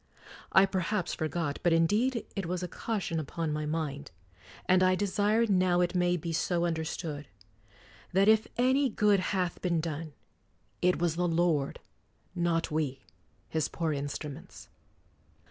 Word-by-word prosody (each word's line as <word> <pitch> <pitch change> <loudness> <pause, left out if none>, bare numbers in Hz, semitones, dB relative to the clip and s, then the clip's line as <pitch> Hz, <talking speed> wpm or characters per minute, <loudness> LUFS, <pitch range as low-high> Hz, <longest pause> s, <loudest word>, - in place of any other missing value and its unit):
I 190 - +7
perhaps 190 -1 -1
for 155 - -1
got, 155 -3 -2
but 175 - +3
indeed 215 +9 +2
it 195 -4 -3
was 180 +1 -2
a - - -2
caution 190 -4 -3
upon 155 +1 -3
my 150 0 -2
mind, 150 -3 -3 0.6
and 185 0 +4
I 185 0 +4
desire 205 +3 +2
now 185 -4 +3
it 175 - +1
may 180 -1 +2
be 165 0 -4
so 170 +1 0
understood, 160 -3 -3 0.8
that 195 +2 +3
if 220 0 +5
any 260 +3 +3
good 210 -3 +3
hath 185 -2 -1
been 170 -3 +1
done, 155 -1 -4 0.7
it 180 0 +3
was 170 -1 0
the 180 0 +1
Lord, 165 -4 +1 0.5
not 170 -2 0
we, 145 -4 -2 0.4
His 160 -2 -1
poor 165 -3 -2
instruments. 145 0 -6
175 Hz, 145 wpm, -30 LUFS, 160-190 Hz, 0.8 s, I